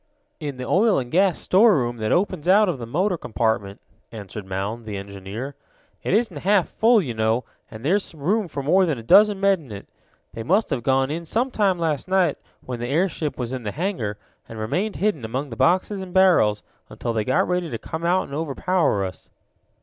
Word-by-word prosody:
"In 145 -5 -5
the 125 - -5
oil 205 - +3
and 125 -2 -3
gasoline 185 0 +3
storeroom 180 - +3
that 110 -1 -2
opens 175 -4 0
out 205 +3 +5
of 165 -8 -2
the 115 - -6
motor 180 - 0
compartment," 110 -3 -1 0.3
answered 105 -2 -8
Mound, 100 +5 -4
the 105 -2 -4
engineer. 100 +7 -7 0.5
"It - - 0
isn't 215 -7 0
half 195 +4 +2
full, 225 -2 +3
you 125 -6 -4
know, 110 +2 0 0.3
and 110 +3 -10
there's 190 +1 0
room 190 +8 0
for 140 -3 -5
more 185 +6 +3
than 155 -5 -1
a 115 - -8
dozen 205 - +5
men 195 -5 +2
in 120 - -13
it. 100 - -8 0.5
They 115 - -6
must 190 - +1
have 135 -4 -1
gone 135 +2 +1
in 165 +2 -5
some 245 +9 0
time 195 -5 +1
last 160 -3 -1
night, 185 -5 +2 0.3
when 125 -2 -5
the 120 - -3
airship 160 0 -1
was 125 0 -4
in 130 - -4
the 105 -3 -4
hangar, 155 - -2 0.3
and 115 - -8
remained 180 - -2
hidden 200 - -1
among 130 +5 -4
the - - -5
boxes 185 - +1
and 185 -1 -9
barrels 170 - +4 0.3
until 120 - -4
they 110 -1 0
got 130 - +1
ready 180 -2 -1
to 115 - -4
come 160 +8 -6
out 180 +2 +2
and - - -10
overpower 155 - 0
us." 95 - -9
150 Hz, 205 wpm, -23 LUFS, 115-190 Hz, 0.5 s, out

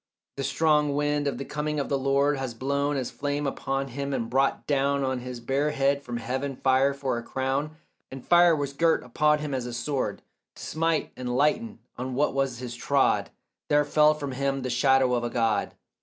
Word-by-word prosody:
The 135 - -2
strong 150 +1 +2
wind 145 0 0
of 140 - -2
the 135 - -5
coming 150 0 -2
of 140 - -2
the 140 - 0
Lord 140 +2 +2
Had 130 -3 -5
blown 140 +3 0
as 130 -2 -3
flame 145 +1 -2
upon 135 0 -2
him, 140 +2 -4
and 115 - -3
brought 135 +2 +1
down 140 -1 +1
On 130 -1 -1
his 125 0 -7
bare 135 +5 0
head 140 -1 +1
from 120 -3 -5
heaven 130 +3 -3
fire 130 +2 +3
for 135 -4 -2
a - - -6
crown, 135 +5 -2 0.3
And 135 -1 -9
fire 175 -1 +6
was 140 -2 -3
girt 165 +3 +2
upon 150 +5 +2
him 150 -2 -4
as 125 -2 -2
a 120 - -6
sword 130 +3 -2 0.3
To - - -10
smite 165 0 -1
and 125 -1 -3
lighten, 215 - 0 0.2
and 125 - -3
on 130 - -5
what 145 +3 +1
ways 135 -3 -1
he 125 +1 -6
trod 135 +3 +1 0.4
There 150 0 +3
fell 150 +1 +4
from 145 -2 -5
him 135 0 -1
the 130 - -2
shadow 130 +1 +3
of 120 -1 0
a 120 - -1
God. 115 -4 0
140 Hz, 210 wpm, -26 LUFS, 130-145 Hz, 0.4 s, fire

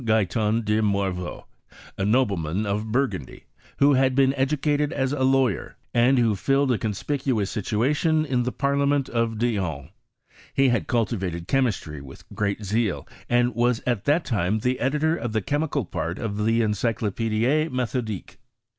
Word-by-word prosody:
Guyton 110 0 +1
de 105 +1 +2
Morveau, 100 -4 -2 0.5
a 95 - -3
nobleman 100 -5 +1
of 105 +2 -2
Bur 135 +4 +3
gundy, 90 - -8 0.3
who 140 +1 +5
had 130 -1 +3
been 135 0 +4
educated 145 +2 0
as 135 +1 -1
a 145 - -3
lawyer, 130 - +1 0.2
and 125 +3 +4
who 115 -4 +3
filled 135 +6 +1
a 120 - +1
conspicuous 110 0 -1
situation 145 - +1
in 130 -4 0
the 125 +1 -1
Parliament 140 0 +1
of 115 -1 -1
Dijon: 95 - -2 0.7
he 135 -1 +4
had 120 - 0
cultivated 95 -8 -1
chemistry 110 - -1
with 65 -1 -13
greatj 100 0 -1
xcul, 105 0 -1 0.2
and 120 0 +2
was 120 +1 +1
at 120 -4 -1
that 150 +4 +2
time 105 -3 0
the 125 +4 -1
editor 150 +5 +1
of 120 -8 -4
the 110 - +1
chemical 145 -2 -1
part 85 +1 -4
of 105 -2 -3
the 115 +1 +3
Encyclopedie 115 - 0
Methodique. 115 -6 -3
115 Hz, 155 wpm, -24 LUFS, 105-135 Hz, 0.7 s, who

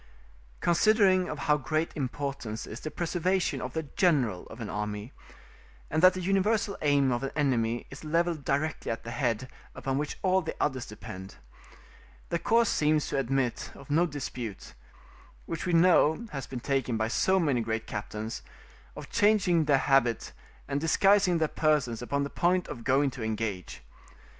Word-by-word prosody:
Considering 185 0 +4
of 150 - -4
how 150 +1 +2
great 155 +4 -1
importance 135 -5 -4
is 110 - -8
the 155 - -5
preservation 175 -3 -1
of 125 0 -5
the 160 - -2
general 135 - +1
of 110 - -11
an 115 - -5
army, 105 +3 -4 0.8
and 155 - +1
that 185 0 +7
the 185 - -3
universal 195 +2 +1
aim 140 -3 +3
of 120 - 0
an 135 - -2
enemy 120 -6 0
is 135 - -10
levelled 165 0 0
directly 145 +3 -1
at 115 - -4
the 115 - -6
head, 120 -1 -1 0.3
upon 135 0 -2
which 150 - -3
all 190 0 +3
the 160 - -5
others 130 -3 -1
depend, 100 -3 -9 0.9
the 170 - 0
course 230 +3 +3
seems 155 -3 +1
to - - -1
admit 135 -1 -1
of 140 +1 -11
no 170 +4 +3
dispute, 125 - -6 0.7
which 165 +1 -4
we 175 - 0
know 170 +3 +4
has 135 -3 -5
been 130 - -5
taken 130 -3 -1
by 110 0 0
so 190 +11 +2
many 140 -8 +1
great 110 0 -2
captains, 105 +1 -5 0.5
of - - -8
changing 195 -6 +3
their 145 -2 +4
habit 135 -4 +2 0.4
and 140 0 -2
disguising 195 +2 +4
their 160 -1 +1
persons 150 -8 +1
upon 140 +3 -1
the 140 - -3
point 180 +1 +1
of 115 - -7
going 135 +2 +2
to 125 - -9
engage. 110 -4 -4
140 Hz, 165 wpm, -28 LUFS, 120-170 Hz, 0.9 s, that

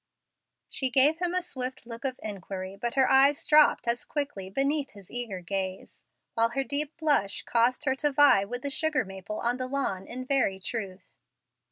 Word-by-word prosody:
She 265 - 0
gave 275 +6 +4
him 355 0 -1
a 365 - 0
swift 260 -6 -6
look 230 0 -9
of 260 -1 -3
inquiry, 195 -2 -6
but 235 +5 -4
her 265 -1 +4
eyes 280 +4 +4
dropped 300 -5 +5
as 235 +1 0
quickly 280 -11 -4
beneath 275 +6 -1
his 200 -3 -13
eager 230 -7 -3
gaze, 190 +1 -5 0.3
while 230 0 +2
her 270 +3 -1
deep 285 +2 -2
blush 290 -12 +1
caused 245 +5 +1
her 265 - +2
to 295 +1 0
vie 280 -8 +5
with 245 +5 -6
the 280 - -2
sugar 315 -4 0
maple 195 +2 -7
on 240 +1 0
the 255 0 -3
lawn 255 -9 -2
in 255 +1 -6
very 255 -8 +1
truth. 195 -3 -5
255 Hz, 185 wpm, -28 LUFS, 200-285 Hz, 0.3 s, dropped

